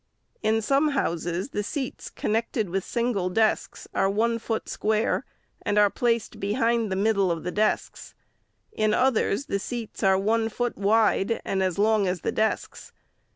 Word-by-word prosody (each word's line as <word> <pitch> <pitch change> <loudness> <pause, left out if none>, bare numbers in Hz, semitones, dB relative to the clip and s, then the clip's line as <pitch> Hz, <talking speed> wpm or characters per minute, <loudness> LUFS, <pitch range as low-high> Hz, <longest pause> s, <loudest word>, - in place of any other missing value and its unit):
In 220 0 +1
some 275 +6 +3
houses, 175 - -1
the 205 - -2
seats 260 +5 -4
con - - -3
nected 220 -3 -1
with 190 0 -1
single 235 -6 -1
desks 220 +3 0
are 195 - +2
one 230 +3 +1
foot 225 0 -3
square, 215 +1 0 0.4
and 205 - -1
are 205 -1 +5
placed 235 -2 -1
behind 230 +1 +1
the - - 0
middle 200 -1 +2
of 165 -2 -2
the 180 - -3
desks; 215 +2 -1 0.6
in 215 -1 +1
others 255 -1 +1
the 200 -9 -1
seats 230 +1 -6
are 190 -1 +4
one 225 +3 +1
foot 240 +2 -2
wide 215 +1 +2
and 190 - 0
as 185 -2 0
long 210 -1 +3
as 180 -2 -2
the - - -1
desks. 220 0 -2
215 Hz, 165 wpm, -26 LUFS, 195-230 Hz, 0.6 s, are